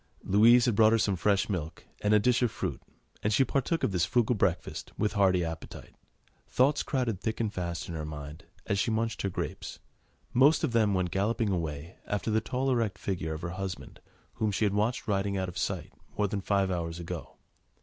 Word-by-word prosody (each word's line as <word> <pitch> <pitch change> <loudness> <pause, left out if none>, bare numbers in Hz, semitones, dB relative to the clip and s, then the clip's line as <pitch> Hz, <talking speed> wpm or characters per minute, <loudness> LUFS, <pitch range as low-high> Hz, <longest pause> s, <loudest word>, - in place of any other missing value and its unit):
Louise 115 +5 +6
had 120 - +2
brought 110 +1 +6
her - - +5
some 100 -3 +1
fresh 100 +3 +2
milk 80 -5 -4 0.2
and 105 - +1
a 105 - +7
dish 120 +4 +2
of 120 - +3
fruit, - - -4 0.4
and 105 - 0
she 120 +6 +4
partook 140 +6 -1
of - - +2
this 90 -2 +1
frugal 120 0 +2
breakfast 90 -3 -1
with 105 - 0
hearty 95 -3 +3
appetite. 80 0 -8 0.6
Thoughts 140 +4 +3
crowded 120 -8 -1
thick 110 -1 -2
and 110 -2 -1
fast 85 -2 -4
in 85 - -6
her 80 -1 -4
mind 75 +1 -8 0.2
as 100 - 0
she - - +1
munched 115 +1 -1
her 100 - -1
grapes; - - -5 0.6
most 140 +7 +5
of 155 - +1
them 110 -4 +3
went 90 -2 0
galloping 105 +3 0
away 80 -2 -4
after 105 +2 -1
the 110 +1 +2
tall, 130 +4 -1
erect 115 -5 0
figure 85 -5 -3
of 80 - -7
her 85 - -2
husband, 95 0 -6 0.4
whom 110 -1 +2
she 105 +2 +1
had 100 - +1
watched 110 +4 0
riding 100 -1 0
out 95 -1 -2
of 90 - -10
sight - - -3 0.2
more 105 0 +2
than 100 0 -3
five 100 -1 +1
hours 85 -1 -3
ago. 85 - -7
100 Hz, 210 wpm, -29 LUFS, 90-115 Hz, 0.6 s, a